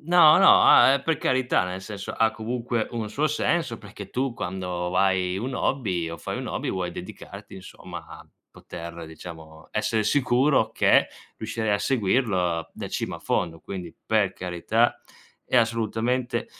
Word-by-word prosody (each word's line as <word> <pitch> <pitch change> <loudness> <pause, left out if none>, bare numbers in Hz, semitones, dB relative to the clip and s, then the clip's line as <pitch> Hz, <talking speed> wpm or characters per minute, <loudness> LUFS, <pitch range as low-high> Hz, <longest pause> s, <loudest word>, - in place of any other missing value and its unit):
No 165 -1 +6
no, 195 - +7
ah, 135 - +7
uhm, 140 - -1
per 160 +1 0
carità 130 -6 +1
nel 90 +1 -5
senso 100 0 -6
ha 110 0 +2
comunque 115 +1 -3
un 115 -2 -3
suo 145 +7 0
senso, 150 -4 0
perché 100 -2 -10
tu 130 0 -1
quando 90 -4 -4
vai 95 0 +1
un 125 +5 -4
hobby 95 -14 -1
o 85 - -6
fai - - -5
un - - -5
hobby - - -3
vuoi 90 -2 -3
dedicarti - - -10
insomma 95 - -9
a - - -12 0.2
poter 85 0 -9
diciamo 80 -1 -11
essere 110 -1 0
sicuro 135 +3 +2
che - - +4 0.3
riuscirai 110 -2 -3
a 100 - +2
seguirlo 95 -8 0
da - - -7
cima - - -3
a - - -13
fondo. 85 -2 -1
Quindi, 90 -2 -7
per 105 -3 +2
carità 95 +6 0 0.4
è - - 0
assolutamente 115 +1 0
110 Hz, 160 wpm, -25 LUFS, 90-125 Hz, 0.4 s, no